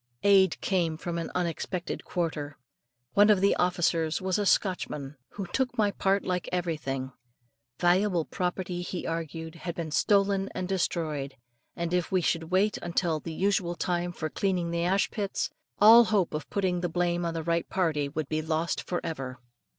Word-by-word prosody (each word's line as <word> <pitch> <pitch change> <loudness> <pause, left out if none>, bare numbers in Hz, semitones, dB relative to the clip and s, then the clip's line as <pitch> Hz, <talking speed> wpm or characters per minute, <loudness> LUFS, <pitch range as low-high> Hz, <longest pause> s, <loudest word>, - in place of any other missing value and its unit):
Aid 195 -3 +5
came 170 -5 0
from 170 +1 -3
an 165 - -4
unexpected 175 +1 -2
quarter. 150 -5 -3 0.6
One 205 +1 +6
of 210 -3 +5
the 200 +1 +4
officers 165 -3 +1
was 190 +1 0
a 205 - +1
Scotchman, 150 -9 0 0.2
and 195 -3 -5
took 250 -2 0
my 210 -2 +3
part 195 0 +1
like 180 -1 -2
everything. 150 -7 -2 0.7
Valuable 180 -1 +3
property, 180 -1 -3
he 180 0 -5
argued, 165 0 -4
had 170 0 -6
been 165 -2 -4
stolen 195 +2 +2
and 185 -1 -2
destroyed; 155 -7 -2 0.4
and 170 0 -3
if 180 -2 0
we 190 - +3
should 165 -1 0
wait 190 +5 +1
until 170 -2 0
the 165 - -7
usual 185 0 0
time 175 +1 -1
for 155 -2 -4
cleaning 180 -4 0
the 170 0 0
ashpits, 195 +2 0 0.3
all 230 +3 +9
hope 200 -5 +1
of 150 - -4
putting 185 -3 0
the 175 - -1
blame 175 0 0
on 165 -1 -2
the 165 - -2
right 170 +1 0
party, 155 -6 0
would 150 0 -3
be 155 +1 -1
lost 160 +1 -1
for 175 - -3
ever. 135 -6 -5
175 Hz, 170 wpm, -28 LUFS, 160-190 Hz, 0.7 s, all